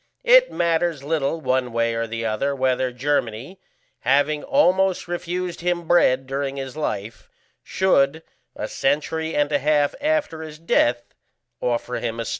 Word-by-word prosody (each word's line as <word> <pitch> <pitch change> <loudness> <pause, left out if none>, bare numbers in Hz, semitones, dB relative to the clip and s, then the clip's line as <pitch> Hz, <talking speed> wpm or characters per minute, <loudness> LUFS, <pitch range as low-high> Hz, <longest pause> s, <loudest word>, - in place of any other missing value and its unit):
It - - +6
matters 170 -3 0
little 150 +1 -1
one 130 -3 0
way 115 0 0
or 115 0 -2
the 115 +1 -4
other 125 +6 -1
whether 130 -1 0
Germany, 125 - -2 0.4
having 145 +4 +2
almost 190 -11 +2
refused 175 0 -4
him 175 -1 -1
bread 135 -7 +3
during 135 +1 -3
his 135 -1 -6
life, 115 -7 -4 0.3
should, 160 -4 +1 0.3
a - - -4
century 160 +3 -1
and 145 0 +1
a 145 - +2
half 145 0 +2
after 300 - 0
his 155 -1 -8
death, 120 -7 +1 0.5
offer 125 0 -1
him 115 -1 -4
a 115 - -3
stone. - - -4
145 Hz, 150 wpm, -22 LUFS, 130-170 Hz, 0.5 s, It